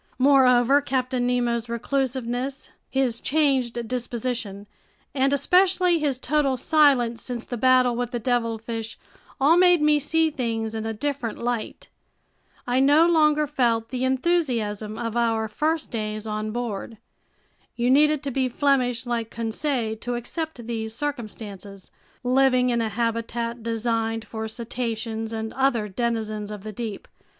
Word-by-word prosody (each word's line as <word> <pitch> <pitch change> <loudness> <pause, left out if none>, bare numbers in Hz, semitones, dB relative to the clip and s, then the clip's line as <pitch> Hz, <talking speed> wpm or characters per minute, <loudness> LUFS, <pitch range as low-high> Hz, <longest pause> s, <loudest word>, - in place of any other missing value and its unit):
Moreover, 265 0 +5
Captain 255 -2 -1
Nemo's 240 -1 0
reclusiveness, 260 +1 -2 0.2
his 260 -3 0
changed 260 -6 +1
disposition, 235 -4 -3 0.5
and 270 0 +2
especially 360 +3 +3
his 285 -4 0
total 275 0 +1
silence 260 -5 +3
since 245 -2 -5
the 245 - -5
battle 255 0 +4
with 245 0 -2
the 240 - -3
devilfish 230 -2 -2 0.4
all 295 +5 +5
made 355 -1 +6
me 300 0 +4
see 320 +2 +1
things 225 -5 -2
in 220 0 -3
a - - -1
different 265 -1 -3
light. 240 -2 -4 0.8
I 245 +1 +1
no 290 +4 +5
longer 305 -3 +4
felt 235 -6 0
the 255 -1 -3
enthusiasm 250 - 0
of 230 -1 -4
our 225 -2 +1
first 310 +8 -1
days 215 -2 -3
on 215 0 -3
board. 225 -1 -4 0.8
You 245 +1 +1
needed 300 +1 +4
to 280 - -3
be 260 0 0
Flemish 250 -3 +1
like 235 -2 -2
Conseil 230 0 -2
to 245 +2 -4
accept 255 +1 -5
these 220 -1 -4
circumstances, 210 -8 -6 0.3
living 255 0 +3
in 235 -1 +1
a 225 - -1
habitat 230 +1 -2
designed 225 -1 -1
for 220 0 -5
cetaceans 225 -1 -4
and 220 0 -4
other 260 -5 +1
denizens 215 -1 -2
of 210 -2 -7
the 215 - -6
deep. 220 -2 -6
240 Hz, 140 wpm, -24 LUFS, 225-270 Hz, 0.8 s, made